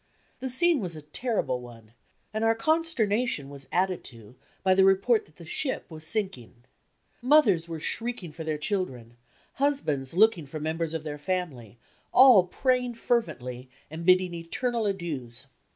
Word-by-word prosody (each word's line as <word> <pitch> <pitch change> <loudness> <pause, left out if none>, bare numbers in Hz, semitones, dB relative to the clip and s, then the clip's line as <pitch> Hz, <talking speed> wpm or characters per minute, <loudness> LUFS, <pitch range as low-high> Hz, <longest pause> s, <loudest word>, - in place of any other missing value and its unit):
The 260 - -3
scene 330 +5 +3
was 180 -6 -4
a 155 - -9
terrible 150 - -2
one, 115 -2 -13 0.4
and 215 +1 -1
our 225 0 +3
con 315 +8 +2
sternation 225 - -1
was 140 -1 -11
added 185 0 0
to 115 -1 -12 0.3
by 190 -1 +4
the 190 +1 +5
report 195 +4 +3
that 150 - -25
the 170 - -12
ship 260 - -3
was 155 -1 -5
sinking. 130 - -2 0.6
Mothers 235 - +4
were 165 -1 -5
shriek 235 +6 -3
ing 170 - -7
for 160 +2 -8
their 155 -1 -2
children, 150 - -3 0.5
husbands 160 - 0
looking 200 -6 +4
for 155 +3 -6
members 160 +1 -2
of 160 - -4
their 150 -1 -6
family, 145 - -4 0.3
all 245 -9 +7
praying 250 +3 0
fervently 125 - -2 0.2
and 160 +1 -6
bidding 185 0 +4
eternal 220 +7 -2
adieus. 140 -11 -4
180 Hz, 160 wpm, -27 LUFS, 145-225 Hz, 0.6 s, all